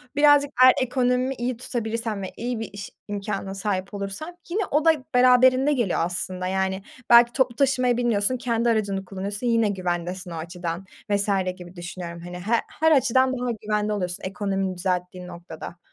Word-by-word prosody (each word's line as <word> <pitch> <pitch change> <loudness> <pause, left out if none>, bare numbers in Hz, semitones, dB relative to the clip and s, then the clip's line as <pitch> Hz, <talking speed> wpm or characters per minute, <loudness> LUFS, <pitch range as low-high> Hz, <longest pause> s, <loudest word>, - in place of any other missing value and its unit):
Birazcık 290 -1 +5
eğer 255 0 +9
ekonomi 255 +1 +1
iyi 245 0 -3
tutabilirsen 225 -3 -3
ve 190 - -5
iyi 240 0 -3
bir 225 - -5
iş 200 0 -7 0.2
imkânına 200 -1 -4
sahip 195 0 -3
olursan 200 - -5
yine 390 +5 0
o 300 +2 +2
da 325 - +8 0.2
beraberinde 255 +3 +5
geliyor 235 -10 0
aslında 185 +1 -3
yani. 190 0 -1 0.3
Belki 240 0 +7
toplu 260 -2 +1
taşımaya 255 -3 +2
binmiyorsun, 240 0 +1
kendi 235 -1 0
aracını 200 -4 0
kullanıyorsun, 200 +4 -4
yine 230 -2 +3
güvendesin 180 -1 -3
o - - -5
açıdan 170 +2 -5 0.2
vs. 200 0 +1 0.3
gibi 180 0 -12
düşünüyorum 175 -1 -7
hani. 175 +1 -8
He 205 +6 -2 0.3
her 320 +1 +4
açıdan 260 -2 +3
daha 250 0 -1
güvende 210 0 -1
oluyorsun 180 -3 -3
ekonomini 195 0 -2
düzelttiğin 180 0 -2
noktada. 170 -1 -9
205 Hz, 160 wpm, -24 LUFS, 185-250 Hz, 0.3 s, eğer